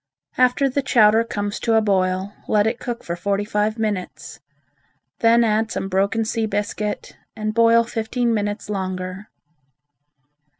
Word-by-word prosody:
After 255 Hz, +2 st, +3 dB
the 275 Hz, +2 st, -1 dB
chowder 225 Hz, -4 st, +4 dB
comes 205 Hz, -3 st, -4 dB
to 230 Hz, -1 st, +1 dB
a 220 Hz, -, +5 dB
boil, 190 Hz, -1 st, 0 dB
let 210 Hz, -1 st, +3 dB
it 230 Hz, +2 st, -1 dB
cook 240 Hz, -1 st, -5 dB
for 170 Hz, -, -4 dB
forty 200 Hz, +3 st, -1 dB
five 210 Hz, +1 st, -1 dB
minutes. 180 Hz, -9 st, -4 dB, 0.8 s
Then 235 Hz, +1 st, +5 dB
add 220 Hz, 0 st, +1 dB
some 195 Hz, -, -3 dB
broken 200 Hz, +4 st, +1 dB
sea 225 Hz, 0 st, -1 dB
biscuit, 210 Hz, 0 st, -3 dB, 0.2 s
and 215 Hz, 0 st, -3 dB
boil 230 Hz, 0 st, +5 dB
fifteen 230 Hz, +1 st, -1 dB
minutes 205 Hz, 0 st, -2 dB
longer. 185 Hz, 0 st, -4 dB
215 Hz, 140 wpm, -21 LUFS, 200-230 Hz, 0.8 s, a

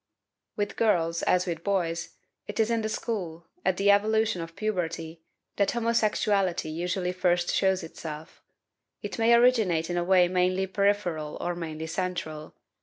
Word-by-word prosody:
With 205 Hz, -1 st, -3 dB
girls, 170 Hz, -7 st, +2 dB
as 180 Hz, 0 st, +2 dB
with 170 Hz, -2 st, -4 dB
boys, 170 Hz, -4 st, -1 dB, 0.3 s
it 205 Hz, -, -6 dB
is 220 Hz, +1 st, +2 dB
in 230 Hz, -1 st, +1 dB
the 220 Hz, -, -2 dB
school, 180 Hz, -8 st, -4 dB, 0.2 s
at 185 Hz, -, +1 dB
the 200 Hz, +1 st, +4 dB
evolution 220 Hz, -1 st, +2 dB
of 165 Hz, 0 st, -8 dB
puberty, 170 Hz, -6 st, -3 dB, 0.4 s
that 200 Hz, -, +2 dB
homosexuality 210 Hz, -7 st, +1 dB
usually 180 Hz, +3 st, -2 dB
first 175 Hz, -1 st, +1 dB
shows 190 Hz, -1 st, +2 dB
itself. 160 Hz, -1 st, -8 dB, 0.6 s
It -, -, -5 dB
may 230 Hz, +1 st, +5 dB
originate 220 Hz, -10 st, +3 dB
in 175 Hz, -, -1 dB
a 175 Hz, -, +1 dB
way 180 Hz, 0 st, +5 dB
mainly 185 Hz, +1 st, +1 dB
peripheral 190 Hz, -6 st, 0 dB
or 175 Hz, -, -2 dB
mainly 160 Hz, -2 st, -5 dB
central. 160 Hz, -3 st, -4 dB
180 Hz, 150 wpm, -27 LUFS, 165-205 Hz, 0.6 s, may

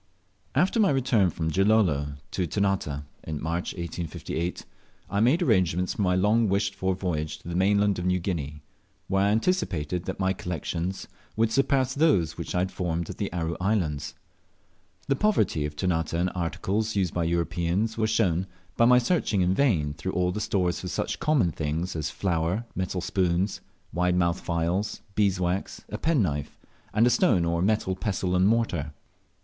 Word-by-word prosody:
AFTER 190 Hz, +6 st, +2 dB
my 205 Hz, -, +5 dB
return 125 Hz, -8 st, +3 dB
from 80 Hz, -1 st, -2 dB
Gilolo 90 Hz, -8 st, +2 dB, 0.2 s
to 90 Hz, -2 st, -1 dB
Ternate, 95 Hz, -7 st, -1 dB, 0.2 s
in 75 Hz, -2 st, -4 dB
March 85 Hz, +3 st, -2 dB
1858, 85 Hz, 0 st, -4 dB, 0.5 s
I 100 Hz, -, +1 dB
made 130 Hz, -, +4 dB
arrangements 90 Hz, -, +2 dB
for -, -, -4 dB
my 90 Hz, -2 st, +2 dB
long 105 Hz, +4 st, +3 dB
wished 100 Hz, 0 st, +1 dB
for 95 Hz, -1 st, -1 dB
voyage 80 Hz, -5 st, -2 dB
to -, -, -15 dB
the 85 Hz, -, -4 dB
mainland 100 Hz, +1 st, +3 dB
of 90 Hz, -, -2 dB
New 90 Hz, 0 st, +2 dB
Guinea, 75 Hz, -5 st, -4 dB, 0.4 s
where 95 Hz, +1 st, +2 dB
I -, -, +3 dB
anticipated 95 Hz, -, 0 dB
that 95 Hz, -, -4 dB
my 95 Hz, 0 st, +2 dB
collections 90 Hz, +1 st, -4 dB, 0.3 s
would 110 Hz, 0 st, +2 dB
surpass 135 Hz, 0 st, +2 dB
those 115 Hz, -, +2 dB
which 85 Hz, 0 st, -5 dB
I -, -, +2 dB
had 95 Hz, +1 st, -1 dB
formed 85 Hz, -2 st, -2 dB
at -, -, -10 dB
the -, -, -2 dB
Aru 85 Hz, -1 st, -2 dB
Islands. 90 Hz, -8 st, -1 dB, 0.9 s
The 140 Hz, -, +2 dB
poverty 110 Hz, -, +1 dB
of 75 Hz, -, -10 dB
Ternate 80 Hz, -2 st, -1 dB
in 90 Hz, +2 st, +1 dB
articles 95 Hz, +5 st, -2 dB
used 95 Hz, -4 st, 0 dB
by 85 Hz, -1 st, 0 dB
Europeans 85 Hz, +5 st, 0 dB
was 110 Hz, -1 st, 0 dB
shown, 95 Hz, -5 st, +1 dB, 0.3 s
by 115 Hz, -, +4 dB
my 125 Hz, +1 st, +7 dB
searching 125 Hz, -, +1 dB
in 90 Hz, +1 st, +3 dB
vain 90 Hz, -, +2 dB
through 95 Hz, +5 st, -4 dB
all 90 Hz, 0 st, +1 dB
the 105 Hz, -, -3 dB
stores 90 Hz, -5 st, 0 dB
for -, -, -6 dB
such -, -, -2 dB
common 140 Hz, -, +2 dB
things 80 Hz, +4 st, -3 dB
as 75 Hz, -1 st, -2 dB
flour, 90 Hz, +4 st, -1 dB
metal 95 Hz, 0 st, -2 dB
spoons, 90 Hz, +1 st, 0 dB, 0.3 s
wide 90 Hz, +2 st, +1 dB
mouthed 85 Hz, -1 st, +1 dB
phials, 85 Hz, +5 st, -1 dB
beeswax, 95 Hz, -2 st, 0 dB
a -, -, -5 dB
penknife, 95 Hz, -, 0 dB, 0.3 s
and 110 Hz, +3 st, +3 dB
a 120 Hz, -, +4 dB
stone 120 Hz, -, +3 dB
or 85 Hz, 0 st, 0 dB
metal 100 Hz, -1 st, +1 dB
pestle 95 Hz, -3 st, -1 dB
and 90 Hz, +1 st, +4 dB
mortar. 95 Hz, -10 st, 0 dB
90 Hz, 170 wpm, -26 LUFS, 85-105 Hz, 0.9 s, my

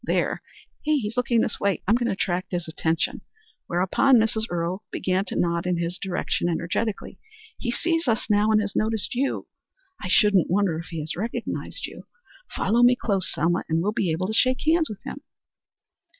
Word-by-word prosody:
There! -, -, 0 dB, 0.4 s
He's 275 Hz, -8 st, 0 dB
looking 240 Hz, -2 st, +2 dB
this 220 Hz, -, -1 dB
way. 200 Hz, -1 st, 0 dB
I'm 210 Hz, -, +5 dB
going 240 Hz, 0 st, +2 dB
to -, -, +1 dB
attract 185 Hz, -1 st, -2 dB
his 175 Hz, -1 st, -2 dB
attention." 160 Hz, 0 st, -1 dB, 0.5 s
Whereupon 190 Hz, +9 st, +3 dB
Mrs. 220 Hz, 0 st, +1 dB
Earle 175 Hz, +4 st, -2 dB
began 185 Hz, +1 st, 0 dB
to -, -, -5 dB
nod 170 Hz, 0 st, 0 dB
in 180 Hz, -1 st, +1 dB
his 170 Hz, +1 st, -2 dB
direction 180 Hz, -2 st, -1 dB
energetically. 180 Hz, +6 st, -2 dB, 0.4 s
"He 245 Hz, -, -3 dB
sees 330 Hz, +5 st, 0 dB
us 225 Hz, -2 st, +1 dB
now, 210 Hz, 0 st, +3 dB
and 215 Hz, -1 st, +5 dB
has 200 Hz, -1 st, -4 dB
noticed 220 Hz, -1 st, 0 dB
you. 270 Hz, +3 st, -1 dB, 0.6 s
I -, -, -4 dB
shouldn't 200 Hz, -2 st, +4 dB
wonder 180 Hz, -3 st, +1 dB
if 170 Hz, -, -8 dB
he 165 Hz, -2 st, -5 dB
has 155 Hz, +1 st, -3 dB
recognized 230 Hz, -, -4 dB
you. -, -, -11 dB, 0.4 s
Follow 230 Hz, +5 st, +1 dB
me 245 Hz, +1 st, +7 dB
close, 195 Hz, -6 st, -1 dB
Selma, 175 Hz, +3 st, +1 dB
and 160 Hz, 0 st, +2 dB
we'll 205 Hz, -, +1 dB
be 205 Hz, -5 st, 0 dB
able 165 Hz, +4 st, -1 dB
to 215 Hz, -, -2 dB
shake 255 Hz, +3 st, +2 dB
hands 320 Hz, +1 st, +3 dB
with 210 Hz, -2 st, -8 dB
him." 280 Hz, -, -7 dB
200 Hz, 185 wpm, -25 LUFS, 175-235 Hz, 0.6 s, me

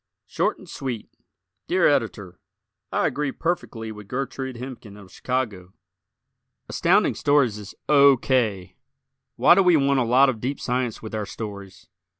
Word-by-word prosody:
Short -, -, -1 dB
and -, -, -15 dB
Sweet 125 Hz, -5 st, -5 dB, 0.6 s
Dear -, -, +3 dB
Editor: 95 Hz, -3 st, -1 dB, 0.5 s
I -, -, +1 dB
agree 145 Hz, -1 st, -1 dB
perfectly 130 Hz, -11 st, -3 dB
with 105 Hz, -2 st, -11 dB
Gertrude 130 Hz, +1 st, -4 dB
Hemken, 120 Hz, -4 st, -9 dB
of 100 Hz, -3 st, -14 dB
Chicago. 105 Hz, -8 st, -3 dB, 0.9 s
Astounding -, -, +2 dB
Stories 140 Hz, -7 st, +2 dB
is 105 Hz, -1 st, -10 dB
O. 140 Hz, -2 st, +6 dB
K. 105 Hz, -9 st, -1 dB, 0.6 s
Why 125 Hz, +8 st, +6 dB
do 195 Hz, -, +4 dB
we 180 Hz, -3 st, +5 dB
want 140 Hz, -1 st, +2 dB
a -, -, +2 dB
lot 125 Hz, +4 st, +5 dB
of 115 Hz, -5 st, -2 dB
deep 135 Hz, +3 st, -3 dB
science 125 Hz, -3 st, -2 dB
with 110 Hz, -, -8 dB
our 105 Hz, -2 st, -3 dB
stories? 100 Hz, -3 st, -8 dB
125 Hz, 150 wpm, -24 LUFS, 105-135 Hz, 0.9 s, O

